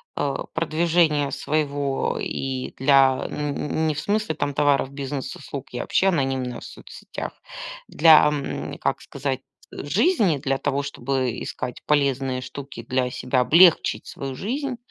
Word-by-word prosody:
э, 140 Hz, -1 st, -1 dB, 0.2 s
продвижения 160 Hz, -2 st, +2 dB
своего 145 Hz, -2 st, -1 dB
и 130 Hz, -1 st, -4 dB
для 135 Hz, -1 st, +4 dB
н 150 Hz, -1 st, -3 dB, 0.2 s
н 160 Hz, -, +2 dB
не 155 Hz, -, 0 dB
в 145 Hz, -, -3 dB
смысле, 205 Hz, -3 st, -1 dB
там, 145 Hz, -1 st, -2 dB
товаров, 140 Hz, -2 st, +2 dB
бизнес 140 Hz, -1 st, -5 dB
услуг. 140 Hz, -1 st, -8 dB
Я 125 Hz, -, -4 dB
вообще 195 Hz, -, +2 dB
анонимно 130 Hz, -6 st, -1 dB
в -, -, -13 dB
соцсетях. -, -, -8 dB, 0.5 s
Для, 160 Hz, -1 st, +7 dB
ам, 150 Hz, -2 st, -3 dB
как -, -, -1 dB
сказать, 135 Hz, -2 st, -3 dB, 0.3 s
жизни, 200 Hz, -, +2 dB
для 135 Hz, 0 st, -1 dB
того, 140 Hz, +1 st, -1 dB
чтобы 130 Hz, -2 st, -2 dB
искать 125 Hz, -1 st, -5 dB
полезные 135 Hz, -3 st, +1 dB
штуки 130 Hz, -1 st, -8 dB
для 130 Hz, -1 st, +1 dB
себя, 125 Hz, +1 st, -1 dB
облегчить 165 Hz, +7 st, +5 dB
свою 135 Hz, -1 st, -6 dB
жизнь, 260 Hz, -, -3 dB
140 Hz, 140 wpm, -23 LUFS, 135-155 Hz, 0.5 s, Для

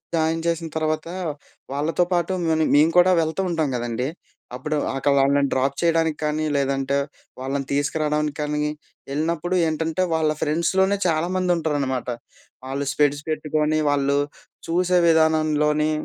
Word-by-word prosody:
Join 160 Hz, 0 st, +1 dB
చేసిన 165 Hz, -1 st, -1 dB
తర్వాత 155 Hz, 0 st, -1 dB, 0.6 s
వాళ్ళతో 150 Hz, +5 st, +1 dB
పాటు 175 Hz, +1 st, +1 dB, 0.2 s
మని 160 Hz, 0 st, +2 dB
మేము 155 Hz, +3 st, +5 dB
కూడా 180 Hz, +1 st, +6 dB
వెళ్తూ 160 Hz, +4 st, -1 dB
ఉంటాం 160 Hz, -4 st, 0 dB
గదండీ! 120 Hz, +1 st, -2 dB, 0.5 s
అప్పుడు 150 Hz, +4 st, -2 dB, 0.2 s
అక్కడ 135 Hz, +1 st, +1 dB
వాళ్ళని 140 Hz, +1 st, +3 dB
డ్రాప్ 135 Hz, +1 st, +1 dB
చేయడానికి 165 Hz, -2 st, +2 dB
కానీ, 150 Hz, +1 st, 0 dB
లేదంటే 135 Hz, 0 st, 0 dB, 0.4 s
వాళ్ళని 135 Hz, +1 st, -3 dB
తీసుకురావడానికి 150 Hz, +1 st, 0 dB
కానీ 150 Hz, 0 st, -1 dB, 0.5 s
ఎళ్ళినప్పుడు 165 Hz, +4 st, -1 dB
ఏంటంటే 160 Hz, +3 st, -1 dB
వాళ్ళ 160 Hz, -1 st, +2 dB
ఫ్రెండ్స్‌లోనే 190 Hz, +6 st, +1 dB
చాలామంది 180 Hz, +3 st, 0 dB
ఉంటారనమాట. 140 Hz, -6 st, -1 dB, 0.6 s
ఆళ్ళు 140 Hz, +1 st, -2 dB
స్పెక్స్ 145 Hz, -1 st, +2 dB
పెట్టుకొని 155 Hz, 0 st, 0 dB
వాళ్ళు 140 Hz, 0 st, +1 dB, 0.5 s
చూసే 180 Hz, +2 st, +2 dB
విధానంలో‌ని 155 Hz, -1 st, +3 dB
155 Hz, 125 wpm, -23 LUFS, 145-165 Hz, 0.6 s, కూడా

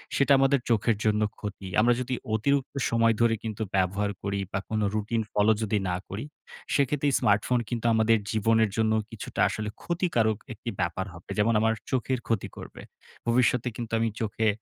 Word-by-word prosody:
সেটা 140 Hz, 0 st, +2 dB
আমাদের 135 Hz, 0 st, +4 dB
চোখের 115 Hz, 0 st, +2 dB
জন্য 105 Hz, 0 st, +2 dB, 0.2 s
ক্ষতি।" 100 Hz, -2 st, -6 dB
আমরা 120 Hz, +2 st, +4 dB
যদি 125 Hz, +1 st, -3 dB, 0.2 s
অতিরিক্ত 140 Hz, +6 st, +1 dB, 0.2 s
সময় 115 Hz, -1 st, +3 dB
ধরে 115 Hz, -1 st, +4 dB
কিন্তু 110 Hz, -1 st, -5 dB
ব্যবহার 100 Hz, +2 st, +1 dB
করি 100 Hz, 0 st, -1 dB
বা 95 Hz, -, -1 dB
কোন 110 Hz, -1 st, 0 dB
রুটিন 110 Hz, +2 st, 0 dB
ফলো 105 Hz, +1 st, +4 dB
যদি 105 Hz, -1 st, 0 dB
না 90 Hz, -, 0 dB
করি, 105 Hz, +6 st, -5 dB, 0.5 s
সেক্ষেত্রে 140 Hz, +1 st, +1 dB
স্মার্টফোন 115 Hz, +2 st, +2 dB
কিন্তু 120 Hz, -1 st, -3 dB
আমাদের 110 Hz, 0 st, +4 dB
জীবনের 110 Hz, 0 st, +3 dB
জন্য 110 Hz, -1 st, +2 dB, 0.2 s
কিছুটা 110 Hz, -, -7 dB
আসলে 110 Hz, 0 st, -3 dB
ক্ষতিকারক 120 Hz, -, +1 dB, 0.2 s
একটি 115 Hz, +2 st, -7 dB
ব্যাপার 85 Hz, +2 st, -1 dB
হবে 85 Hz, -, -14 dB
যেমন 115 Hz, +2 st, +3 dB
আমার 110 Hz, 0 st, +3 dB, 0.2 s
চোখের 130 Hz, 0 st, 0 dB
ক্ষতি 115 Hz, -4 st, 0 dB
করবে। -, -, -9 dB, 0.5 s
ভবিষ্যতে 125 Hz, 0 st, +2 dB
কিন্তু 115 Hz, -2 st, -6 dB
আমি 115 Hz, 0 st, +1 dB
চোখে 110 Hz, +1 st, 0 dB
110 Hz, 170 wpm, -27 LUFS, 105-120 Hz, 0.5 s, আমাদের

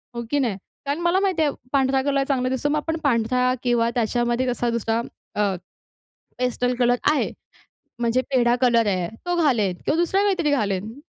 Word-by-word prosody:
हो 235 Hz, -, -3 dB
की 290 Hz, -, +2 dB
नाही? 235 Hz, -8 st, 0 dB, 0.3 s
कारण 285 Hz, +4 st, -1 dB
मला 345 Hz, +2 st, +2 dB
माहिती 380 Hz, -5 st, +1 dB
आहे, 295 Hz, -, +2 dB, 0.2 s
पांढरा 270 Hz, -1 st, +2 dB
कलर 275 Hz, 0 st, +1 dB
चांगला 255 Hz, -2 st, 0 dB
दिसतो. 260 Hz, +3 st, -1 dB
मग 300 Hz, -, +1 dB
आपण 320 Hz, +2 st, -2 dB
पांढरा 250 Hz, -1 st, +2 dB
किंवा 240 Hz, -2 st, +2 dB
त्याच्यामध्ये 240 Hz, +2 st, 0 dB
असा 240 Hz, 0 st, -1 dB
दुसरा 230 Hz, -1 st, 0 dB, 0.4 s
अ, 205 Hz, -2 st, +1 dB, 0.8 s
पेस्टल 250 Hz, 0 st, 0 dB
कलर 245 Hz, 0 st, +4 dB, 0.2 s
आहे, 305 Hz, -, 0 dB, 0.7 s
म्हणजे 235 Hz, +1 st, +1 dB
पेढा 240 Hz, -1 st, +4 dB
कलर 235 Hz, -3 st, +3 dB
आहे, 185 Hz, -3 st, 0 dB, 0.2 s
तो 355 Hz, 0 st, 0 dB
घालेन 215 Hz, -, +2 dB
किंवा 315 Hz, -, +1 dB
दुसरा 365 Hz, +3 st, +2 dB
काहीतरी 375 Hz, -7 st, +1 dB
घालेन. 215 Hz, -1 st, -1 dB
250 Hz, 170 wpm, -23 LUFS, 235-290 Hz, 0.8 s, कलर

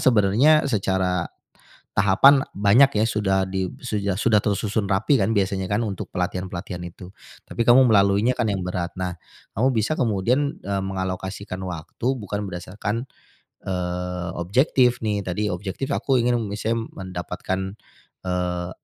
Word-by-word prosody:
sebenarnya 125 Hz, +7 st, +4 dB
secara 95 Hz, -7 st, 0 dB, 0.7 s
tahapan 120 Hz, +8 st, +6 dB
banyak, 110 Hz, +8 st, +5 dB
ya, -, -, +4 dB
sudah 95 Hz, -3 st, 0 dB
di 95 Hz, 0 st, -1 dB
sudah- 105 Hz, -5 st, -2 dB
sudah 110 Hz, -3 st, +4 dB
tersusun 105 Hz, +1 st, -1 dB
rapi, 100 Hz, +8 st, +2 dB
kan, 105 Hz, +3 st, +1 dB
biasanya, 95 Hz, -1 st, 0 dB
kan, 105 Hz, +3 st, 0 dB
untuk 100 Hz, -4 st, -4 dB
pelatihan-pelatihan 90 Hz, 0 st, -3 dB
itu, 90 Hz, +1 st, -11 dB, 0.4 s
tapi 115 Hz, -, -1 dB
kamu 125 Hz, +2 st, +6 dB
melaluinya, 105 Hz, +3 st, +3 dB
kan, 115 Hz, -, 0 dB
yang 95 Hz, -, -2 dB
berat. 90 Hz, -1 st, -3 dB
Nah, 90 Hz, -1 st, -3 dB, 0.4 s
kamu 130 Hz, +5 st, +3 dB
bisa 110 Hz, +8 st, 0 dB
kemudian, 125 Hz, +5 st, 0 dB
eee, 100 Hz, 0 st, -2 dB
mengalokasikan 95 Hz, 0 st, -4 dB
waktu 90 Hz, +5 st, -6 dB
bukan 105 Hz, -2 st, -4 dB
berdasarkan, 105 Hz, +7 st, -4 dB, 0.6 s
eee, 90 Hz, -1 st, -3 dB
objektif, 125 Hz, -, +2 dB
nih, 105 Hz, -2 st, -1 dB
tadi 105 Hz, +3 st, -1 dB
objektif 95 Hz, +8 st, -4 dB
aku 135 Hz, -2 st, +1 dB
ingin 120 Hz, 0 st, +2 dB
misal 110 Hz, +2 st, -1 dB
mendapatkan, 95 Hz, +2 st, -4 dB, 0.5 s
eee, 90 Hz, -1 st, -2 dB
100 Hz, 135 wpm, -23 LUFS, 95-115 Hz, 0.7 s, tahapan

